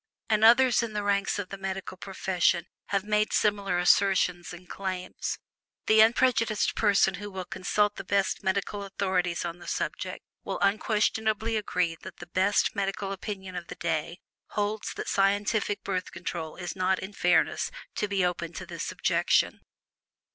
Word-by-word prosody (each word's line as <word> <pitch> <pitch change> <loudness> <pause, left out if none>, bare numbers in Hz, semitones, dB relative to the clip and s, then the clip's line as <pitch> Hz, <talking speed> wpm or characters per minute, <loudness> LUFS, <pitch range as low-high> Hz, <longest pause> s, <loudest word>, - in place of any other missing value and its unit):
And 215 0 +3
others 240 +2 +6
in 230 -2 -4
the 210 -1 -2
ranks 200 0 +1
of 205 -2 -4
the 195 - -7
medical 190 -1 -4
profession 185 -2 0 0.2
have 200 -1 0
made 210 0 +1
similar 200 -3 +1
assertions 180 -1 +3
and 175 +1 -11
claims. 185 -1 -4 0.5
The 215 0 +6
unprejudiced 230 -1 +3
person 200 -3 +3
who 205 - -5
will 190 -2 -6
consult 205 +3 0
the - - -5
best 195 -1 0
medical 200 +2 -1
authorities 185 -3 -1
on 170 0 -5
the - - -12
subject - - -3 0.2
will - - -3
unquestionably 215 +1 +1
agree 180 -5 0
that 190 - -10
the - - -9
best 190 +5 +1
medical 195 0 -2
opinion 190 -1 -6
of 175 -1 -5
the - - -7
day 165 0 -2 0.3
holds 210 +1 -2
that - - -5
scientific 205 +1 +1
Birth 185 -2 -2
Control 170 -2 -5
is 180 0 -5
not 185 0 +1
in 190 +3 -7
fairness 160 -4 +2 0.3
to 210 - 0
be 195 -2 +1
open 175 -1 -2
to 190 - -6
this 170 -2 -5
objection. - - +1
195 Hz, 160 wpm, -28 LUFS, 180-210 Hz, 0.5 s, others